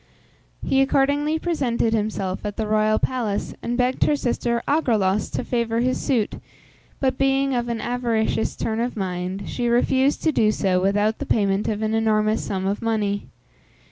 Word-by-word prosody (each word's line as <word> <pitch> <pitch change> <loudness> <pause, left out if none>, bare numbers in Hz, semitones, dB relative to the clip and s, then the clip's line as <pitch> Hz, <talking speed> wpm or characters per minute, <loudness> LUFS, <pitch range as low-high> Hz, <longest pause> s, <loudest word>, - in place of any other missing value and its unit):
He 270 - +3
accordingly 285 +3 +2
presented 260 -9 0
himself 205 -3 -2
at 205 -1 -4
the 220 - -1
royal 215 0 +2
palace, 230 -6 -2
and 240 +1 -2
begged 250 +1 +2
her 300 - +3
sister 240 -3 -1
Agraulos 215 -10 +1
to - - -2
favour 235 -1 0
his 255 +1 0
suit; 230 -6 0 0.6
but, 260 -1 0
being 270 0 +2
of 240 -1 -1
an 230 -1 -2
avaricious 235 -2 -1
turn 220 0 -2
of 240 0 -2
mind, 185 0 -3
she 245 -1 -2
refused 260 +3 +2
to 320 - +3
do 215 -7 +3
so 185 -3 +1
without 205 +3 +1
the 285 - -5
payment 200 -2 +1
of 215 0 -1
an 215 0 0
enormous 215 -1 +1
sum 190 -1 -3
of 200 +3 -1
money. 210 -3 -1
225 Hz, 170 wpm, -23 LUFS, 210-255 Hz, 0.6 s, He